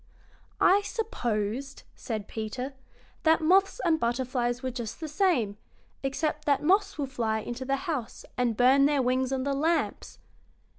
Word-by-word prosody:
"I 395 +2 +5
supposed," 265 - -3
said 215 -3 -5
Peter, 250 +5 -5 0.5
"that 320 0 +4
moths 380 +7 +3
and 325 -2 +3
butterflies 245 0 -1
were 260 - -1
just 235 -3 -6
the 320 - -4
same, 300 - +1 0.4
except 300 +2 -2
that 285 -2 +2
moths 390 +5 +2
will 290 - -1
fly 230 -5 -1
into 240 +4 -5
the 275 +1 +1
house 290 -10 -4
and 240 -3 0
burn 270 +3 +5
their 290 -3 +2
wings 255 +1 +1
on 265 -1 -1
the 280 +1 0
lamps." 320 +4 -1
270 Hz, 150 wpm, -28 LUFS, 240-315 Hz, 0.5 s, I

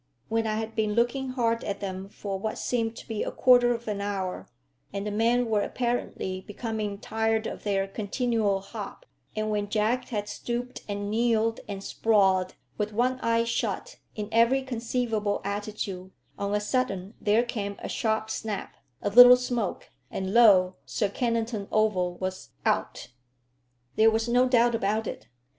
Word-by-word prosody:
When 225 0 +1
I 215 - 0
had 225 0 -4
been 215 -1 +1
looking 245 +3 +1
hard 230 -2 0
at 200 -1 -3
them 190 0 -5
for 195 -1 -5
what 215 +2 -3
seemed 230 -2 -1
to - - -11
be 220 -2 -3
a - - -1
quarter 245 -1 +5
of 235 -1 -3
an 205 -2 -2
hour, 195 -2 -3 0.4
and 200 0 -4
the 210 - -2
men 235 +4 +2
were 215 -3 +1
apparently 235 -7 -2
becoming 210 0 -4
tired 220 +1 0
of - - -5
their 195 -2 0
continual 210 -1 0
hop, 200 - -8 0.3
and 215 0 -1
when 205 -1 -1
Jack 230 +4 +1
had 205 -3 -3
stooped 245 +3 -4
and 205 0 -3
kneeled 225 0 +2
and 195 -1 -6
sprawled, 190 -5 +2 0.2
with 210 0 -1
one 250 +3 +1
eye 230 -1 +2
shut, 230 0 -2 0.2
in 210 -1 -4
every 235 +4 +4
conceivable 230 -4 -1
attitude, 200 -2 -4 0.3
on 200 +1 -2
a - - +2
sudden 210 -4 -1
there 215 +2 +3
came 210 -5 -4
a - - -6
sharp 220 -1 -1
snap, 215 -3 -4 0.3
a 205 - +1
little 245 +3 +10
smoke, 245 -5 -3 0.2
and 190 0 -3
lo, 190 -6 +6
Sir 135 +10 -1
Kennington 230 -2 -1
Oval 185 -5 +1
was 185 +1 -5 0.2
out! - - -1 0.9
There 220 +1 +7
was 225 +1 0
no 245 +2 +4
doubt 240 -1 +4
about 220 0 0
it. 110 - -6
220 Hz, 165 wpm, -27 LUFS, 200-235 Hz, 0.9 s, little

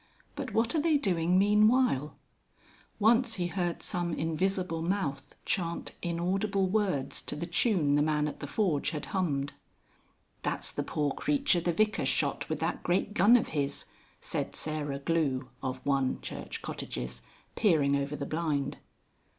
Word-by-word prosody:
"But - - -4
what 225 +1 +1
are 315 - +2
they 315 -1 +3
doing 180 - +2
meanwhile?" 210 - +3 0.8
Once 230 +2 +4
he 180 - -1
heard 175 -1 -2
some 175 -2 -1
invisible 170 +1 -1
mouth 165 -6 -2
chant 170 -3 -1
inaudible 190 +4 0
words 185 -10 0
to - - -5
the 160 +3 -3
tune 170 - +2
the 145 - +4
man 150 0 +1
at 150 - -6
the 145 - -5
forge 160 -5 +1
had 155 -2 -4
hummed. 145 -7 0 0.9
"That's - - -2
the - - -2
poor 145 -2 -1
creature 275 - +1
the 175 - +1
Vicar 215 +5 +1
shot - - 0
with - - -2
that - - -1
great 185 +3 0
gun 210 +6 +6
of 230 - -2
his," 145 -2 -1 0.3
said - - -3
Sarah 150 -2 -2
Glue 140 -4 0
(of 130 -1 -4
1, 135 -2 +1
Church - - -6
Cottages) 60 0 -5 0.3
peering 155 -10 +3
over 140 +1 -1
the 140 - -4
blind. 155 -3 -1
170 Hz, 150 wpm, -30 LUFS, 145-200 Hz, 0.9 s, gun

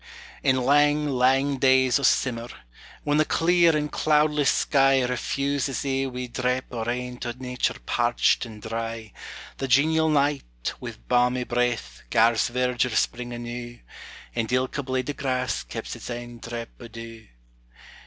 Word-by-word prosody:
In 135 -2 +3
lang, 145 +3 +3
lang 135 +2 +2
days 130 0 +4
o' - - -5
simmer, 120 -3 +1 0.6
when 145 0 +1
the - - +6
clear 170 0 +3
and 150 0 -2
cloudless 150 -1 +2
sky 135 -2 +3
Refuses 140 +1 -1
ae 135 0 0
wee 125 -1 -5
drap 125 +1 -1
o' 115 -2 -3
rain 125 +1 -3
to 120 -1 -4
nature 125 0 -2
parched 120 0 +2
and 110 -3 -10
dry, 115 -1 -5 0.4
The 135 - -3
genial 160 +5 +3
night, 140 - 0
wi' - - -7
balmy 125 - +2
breath, 120 - -2
gars 115 - +3
verdure 125 -1 0
spring 120 +1 0
anew, 120 0 -6 0.6
And 115 -1 -2
ilka 130 +3 0
blade 130 0 -2
o' - - -7
grass 130 -2 -1
keps - - -6
its - - -9
ain 120 0 -6
drap 115 0 -6
o' 120 - -9
dew. 115 0 -10
125 Hz, 145 wpm, -25 LUFS, 120-140 Hz, 0.6 s, the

